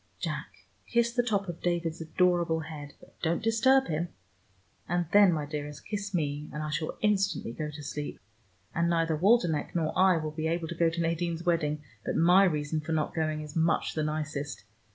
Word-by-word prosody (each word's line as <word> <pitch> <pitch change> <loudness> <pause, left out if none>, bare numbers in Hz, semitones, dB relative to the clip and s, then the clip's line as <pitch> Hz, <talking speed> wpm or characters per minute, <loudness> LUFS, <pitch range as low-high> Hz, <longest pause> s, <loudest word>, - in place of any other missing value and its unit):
Jack, - - -5 0.2
kiss 235 0 +2
the 245 - +3
top 205 -5 0
of 175 -1 -6
David's 170 -2 -1
adorable 170 0 +2
head, 150 -3 -8
but - - -20
don't 170 +5 0
disturb 260 +4 +4
him. 160 +2 -1 0.8
And 175 0 +1
then, 205 -2 +7
my 155 -3 -1
dearest, 145 0 -6
kiss 200 -1 -4
me, 150 -4 -2
and 150 - -4
I 150 - -3
shall 155 +1 -2
instantly 195 - +1
go 150 +4 -4
to 150 0 -8
sleep. 145 +1 -5 0.5
And 170 +1 +1
neither 165 -1 +2
Waldenech 175 -3 +2
nor 160 -2 0
I 185 -1 +5
will 155 -1 -3
be 155 +1 -2
able 165 0 -1
to - - -3
go 170 0 +3
to 170 +1 -3
Nadine's 165 0 -1
wedding, 150 -3 +1 0.2
but - - -2
my 180 +4 +6
reason 155 -2 0
for 160 +1 -3
not 155 -1 0
going 155 -1 -1
is 150 -1 -9
much 165 0 +1
the 155 - -1
nicest. 150 -2 -3
165 Hz, 195 wpm, -29 LUFS, 155-180 Hz, 0.8 s, then